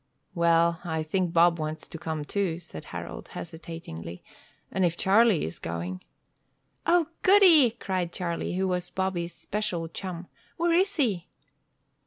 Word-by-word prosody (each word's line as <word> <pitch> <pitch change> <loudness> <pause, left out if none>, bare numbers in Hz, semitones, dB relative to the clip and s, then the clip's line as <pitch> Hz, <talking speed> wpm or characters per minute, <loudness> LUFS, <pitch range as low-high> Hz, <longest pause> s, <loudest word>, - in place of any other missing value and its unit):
"Well 170 0 +3
I 160 -2 -2
think 175 +2 0
Bob 170 0 +4
wants 155 0 -4
to 165 - -8
come, 155 -2 -3
too," 190 -2 -1
said 160 - -9
Harold, - - -7
hesitatingly, 160 - -8 0.5
"and 190 - 0
if 170 -1 +1
Charlie 205 -1 +4
is 80 - -6
going 85 +2 -4 0.4
" - - -46
"O, 340 - +2 0.2
goody!" 370 - +7
cried 185 -3 -2
Charlie, 175 -1 -3
who 190 +1 +1
was 180 -1 -1
Bobby's 175 -3 -2
special 195 -6 -3
chum. 175 +1 -6 0.3
"Where 340 0 +2
is 385 +3 +3
he?" 205 - 0
175 Hz, 145 wpm, -27 LUFS, 165-195 Hz, 0.5 s, goody